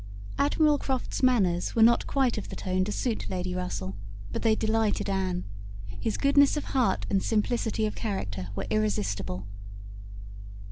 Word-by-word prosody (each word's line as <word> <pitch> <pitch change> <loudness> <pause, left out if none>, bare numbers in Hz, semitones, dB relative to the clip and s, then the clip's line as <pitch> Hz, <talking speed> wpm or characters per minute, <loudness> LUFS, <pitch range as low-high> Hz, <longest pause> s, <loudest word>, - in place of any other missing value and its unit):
Admiral 295 +1 +3
Croft's 265 -2 -2
manners 195 -10 +2
were 225 - +5
not 235 +1 +4
quite 265 -4 +1
of 210 - -5
the - - -6
tone 185 0 -1
to 205 - -3
suit 230 +2 -2
Lady 180 -1 -3
Russell, 140 - -3 0.4
but - - -3
they 220 -1 +3
delighted 220 -2 0
Anne. 185 -2 -1 0.6
His 220 - -1
goodness 280 +1 +4
of 295 - -2
heart 255 -3 0
and 195 -1 +1
simplicity 220 0 0
of 215 - -2
character 100 - -4
were 100 -1 -3
irresistible. 100 -3 -1
210 Hz, 150 wpm, -28 LUFS, 180-240 Hz, 0.6 s, were